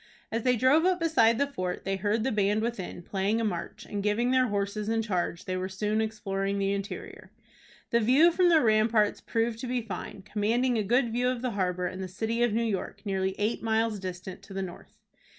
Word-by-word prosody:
As 225 +1 -1
they 250 +1 +3
drove 260 +7 +4
up 365 0 +2
beside 235 -9 +4
the 280 - +2
fort, 185 -10 -4
they 195 0 0
heard 210 +3 0
the 265 - 0
band 210 0 +1
within, 205 -7 -4
playing 200 +5 0
a - - 0
march, 175 -6 -4
and, 205 - -4
giving 215 +5 +1
their 255 -1 +4
horses 205 0 -2
in 225 0 +1
charge, 180 -4 -2
they 185 - -2
were 185 +1 -2
soon 210 +3 -1
exploring 200 -3 -2
the 195 0 +1
interior. 200 +1 -6 0.6
The 235 - +4
view 265 +10 +5
from 355 +1 +3
the 325 -2 +5
ramparts 215 -2 +3
proved 225 0 -1
to 255 - -5
be 245 -1 -1
fine, 200 -2 -7
commanding 225 +5 +1
a 220 - +2
good 240 +3 +2
view 245 +2 +1
of 250 -1 -3
the 250 - 0
harbor 180 -3 -1
and 185 +1 -4
the 190 - -4
city 220 +6 -2
of 240 -1 +3
New 230 +2 +1
York, 205 -4 -3
nearly 190 -1 -1
eight 210 +3 -1
miles 225 -1 0
distant 185 0 -7
to 195 - -12
the 195 - -1
north. 175 -2 -10
215 Hz, 220 wpm, -28 LUFS, 195-235 Hz, 0.6 s, view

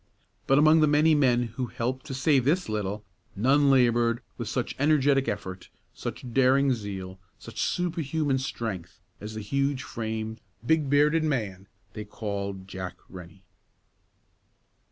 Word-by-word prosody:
But 135 - +4
among 155 +2 +6
the 155 - +5
many 150 +2 +4
men 125 -5 +3
who 120 +2 -4
helped 130 +6 -4
to 135 - -5
save 135 -1 +3
this 170 +8 +1
little, 105 -1 -3 0.3
none 140 +7 +3
labored 120 -3 +3
with 115 -3 -5
such 125 +1 -2
energetic 140 -2 +3
effort, 95 -2 -5 0.2
such 125 -2 -7
daring 135 +1 +4
zeal, 95 -4 -6 0.2
such - - -7
superhuman 160 -5 0
strength, 115 -9 -5 0.2
as 105 +1 -7
the 110 - -4
huge 140 +4 -1
framed, 110 -1 -5 0.2
big 155 0 +2
bearded 150 +3 +3
man 105 -10 -2 0.3
they 110 - -6
called 100 -2 -5
Jack 95 -2 -6
Rennie. 90 +1 -12
125 Hz, 135 wpm, -27 LUFS, 105-145 Hz, 0.3 s, among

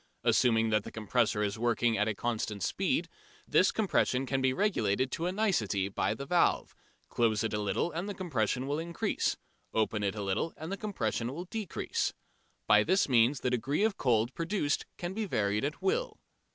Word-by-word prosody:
Assuming 115 -3 +3
that 105 -1 +2
the - - -8
compressor 110 -1 0
is 105 +1 -2
working 120 -1 +2
at 105 +1 +1
a 110 - -1
constant 110 -3 -2
speed, 195 - 0 0.4
this - - +4
compression 135 - +1
can 135 0 -1
be 130 0 +3
regulated 130 - +1
to 170 - -2
a - - 0
nicety 110 - 0
by 100 +2 -1
the 140 - -6
valve: 175 +4 +2 0.3
close 115 -2 +1
it 110 - -2
a 105 - 0
little 105 +11 0
and 175 +6 -4
the 205 - -4
compression 130 - -1
will 145 +2 -1
increase: 170 +1 -1 0.4
open 110 -1 +1
it 100 0 -1
a 105 - -4
little 100 +12 -1
and 160 +3 -6
the - - -1
compression 125 - -2
will 170 +6 -6
decrease. 215 -1 -3 0.5
By 105 0 +5
this 190 - +2
means 125 +1 +3
the 125 - 0
degree 135 - 0
of 220 -2 +2
cold 120 - +1
produced 165 -3 -1
can 175 +1 -4
be 220 +1 -2
varied 105 - 0
at 145 +2 -3
will. 475 +6 0
125 Hz, 190 wpm, -30 LUFS, 110-175 Hz, 0.5 s, By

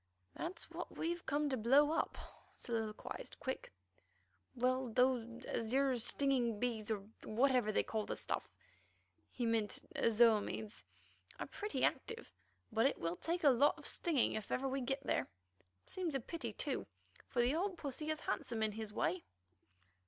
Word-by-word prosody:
"That's 340 +3 -5
what - - -6
we 330 - 0
have 345 0 -5
come 295 +1 +2
to 265 - +1
blow 275 +7 +5
up," 325 - 0 0.4
soliloquized 225 -3 -4
Quick. 260 - -4 0.8
"Well, 255 +1 +2
those 245 -1 +2
'azure 260 +4 +1
stinging 240 -2 +1
bees,' 225 -2 -1
or 205 -2 -2 0.2
whatever 245 -1 +3
they - - +2
call 220 -1 -2
the - - -2
stuff - - -3 0.8
(he 245 - -2
meant 225 -2 0
azo 230 0 +6
imides) 215 +1 -5 0.6
are - - -2
pretty 420 +1 -3
active, 460 0 -1 0.4
but 225 +3 +4
it - - 0
will 165 0 -1
take 335 - -2
a 290 - +8
lot 270 +4 +4
of - - -11
stirring 315 -8 +2
if 215 - -4
ever 270 +1 +1
we 270 +1 -1
get 270 +2 -1
there. 130 - +1 0.6
Seems 350 -6 -2
a - - +2
pity, 330 +7 -4
too, - - -3 0.4
for 250 - -2
the 250 +3 +3
old 365 +3 0
pussy 300 +1 -4
is 310 0 -1
handsome 225 -2 -1
in 215 - +2
his 215 0 -5
way." 185 -3 0
250 Hz, 160 wpm, -37 LUFS, 225-285 Hz, 0.8 s, a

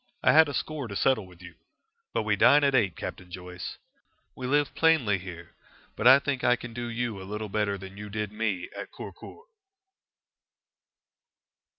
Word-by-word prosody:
I - - +6
had 160 -1 +7
a - - -5
score 150 -3 -3
to 100 - -7
settle 110 -3 +2
with 90 -1 -16
you. 90 -1 -11 0.6
But - - -1
we - - +1
dine 145 +1 +6
at 140 -1 +3
eight, 100 -9 +2
Captain 90 - -7
Joyce. 90 0 -7 0.6
We 125 - -5
live 145 +2 +1
plainly 135 -12 +3
here, 85 -2 -10 0.4
but 115 - +2
I 130 +2 +10
think 140 -2 -2
I 125 - +5
can 120 -1 -9
do 120 0 -4
you 115 -4 -3
a 95 - -9
little 105 0 -4
better 100 -1 0
than 95 0 -10
you 105 0 -7
did 105 0 -3
me 105 -4 -2
at - - -7
Kurkur." 445 - -10
110 Hz, 180 wpm, -27 LUFS, 95-130 Hz, 0.6 s, I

